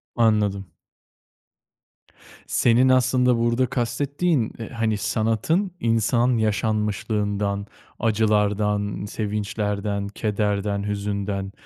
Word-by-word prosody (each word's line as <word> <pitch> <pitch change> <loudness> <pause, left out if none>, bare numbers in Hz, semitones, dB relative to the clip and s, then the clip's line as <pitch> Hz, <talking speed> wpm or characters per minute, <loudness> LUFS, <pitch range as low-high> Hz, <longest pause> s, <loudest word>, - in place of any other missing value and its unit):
Anladım. 105 -6 +1 1.7
Senin 125 +2 +3
aslında 125 -1 +3
burada 120 +2 +2
kastettiğin, 130 +3 -1
eee, 115 - -6
hani, 115 -2 -1
sanatın 115 - 0
insan 115 +1 +2
yaşanmışlığından, 105 -2 -1 0.3
acılardan, 105 -2 +1
sevinçlerden, 105 -1 -2
kederden, 105 -1 -1
hüzünden, 100 -1 -3
105 Hz, 70 wpm, -23 LUFS, 100-115 Hz, 1.7 s, Senin